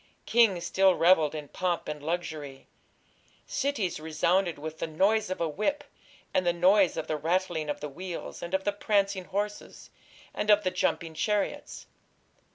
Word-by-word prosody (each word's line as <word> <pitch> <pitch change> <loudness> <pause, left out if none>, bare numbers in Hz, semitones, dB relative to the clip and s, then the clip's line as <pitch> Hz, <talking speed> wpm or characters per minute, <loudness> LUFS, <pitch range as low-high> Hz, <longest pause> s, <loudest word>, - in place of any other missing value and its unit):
Kings 220 -7 +3
still 190 -1 +4
revelled 165 -3 +4
in 150 -1 -6
pomp 180 -2 -2
and 150 -1 -5
luxury. 155 -4 -4 0.8
Cities 270 - -1
resounded 170 +3 +1
with 155 +2 -7
"the - - -2
noise 200 +7 +2
of 185 - -3
a 170 - 0
whip, 215 - -1 0.5
and 185 - +2
the 175 - +3
noise 185 +2 +4
of - - -2
the 155 - -2
rattling 165 0 -1
of 145 - -3
the 150 - -3
wheels, 175 +4 -7
and 170 +2 -2
of 190 - -1
the 205 - +1
prancing 200 -2 0
horses, 205 +2 -5 0.4
and 210 - -3
of 210 0 +6
the 185 - 0
jumping 170 -2 -1
chariots. 210 +5 -2
180 Hz, 165 wpm, -28 LUFS, 160-200 Hz, 0.8 s, of